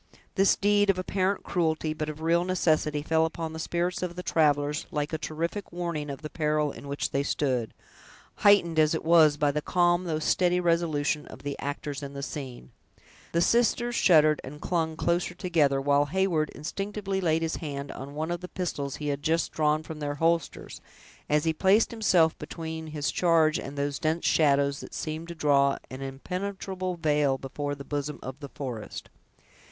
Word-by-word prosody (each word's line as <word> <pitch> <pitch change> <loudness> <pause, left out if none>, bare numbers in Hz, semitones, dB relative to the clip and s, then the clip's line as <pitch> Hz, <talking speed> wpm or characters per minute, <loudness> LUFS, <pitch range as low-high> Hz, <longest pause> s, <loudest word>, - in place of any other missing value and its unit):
This 195 0 +4
deed 205 0 +3
of 195 - +3
apparent 190 +1 -1
cruelty, 160 -3 0
but 155 -1 -4
of 155 +1 -7
real 170 +2 +2
necessity, 155 -5 +1
fell 160 +1 +2
upon 160 0 -3
the 160 - -6
spirits 175 +2 -1
of 180 -1 -3
the 180 - -6
travelers 150 -2 +1
like 150 +1 -3
a 160 - -1
terrific 170 +6 -4
warning 170 -4 -3
of 140 +2 -7
the 155 - -5
peril 150 -2 0
in 140 - -10
which 140 +1 -2
they 140 - +1
stood, 130 -5 -1 0.7
heightened 175 -6 +4
as 155 +1 +4
it 160 - -4
was 160 -3 +6
by 145 -1 +2
the 150 +1 -2
calm 175 +2 +2
though 160 -3 -1
steady 180 +3 +2
resolution 160 -4 0
of - - -12
the 145 0 -3
actors 145 0 -4
in 140 -1 -7
the 140 - -5
scene. 130 - -7 0.6
The 170 - +1
sisters 240 +3 +2
shuddered 155 -8 +5
and 145 +3 -9
clung 160 -1 -1
closer 175 +1 0
to 180 - -9
each 175 -2 -3
other, 140 -2 +4
while 145 +1 +3
Heyward 170 -2 +1
instinctively 195 +4 -3
laid 165 -2 +1
his 165 - -1
hand 140 -3 -5
on 140 +2 -8
one 160 +2 -2
of 175 0 -3
the 180 - -6
pistols 145 -7 -3
he 150 -1 -4
had 140 0 -2
just 165 +2 +1
drawn 155 0 +1
from 155 -1 -8
their 145 -1 -3
holsters, 165 +1 -1 0.5
as 150 0 +3
he 160 -1 +1
placed 195 +7 +3
himself 185 -8 +3
between 160 -1 -6
his 150 -2 -2
charge 165 -3 +3
and 140 +1 -7
those 140 0 -1
dense 160 +2 -1
shadows 140 -2 +3
that - - -9
seemed 155 +1 -4
to 170 - -7
draw 140 -3 +3
an 130 +1 -7
impenetrable 185 +6 -4
veil 150 -4 +1
before 145 +2 -4
the 140 0 -10
bosom 145 0 -3
of 130 +2 -7
the 140 -2 -8
forest. 125 -7 -7
155 Hz, 190 wpm, -27 LUFS, 145-175 Hz, 0.7 s, was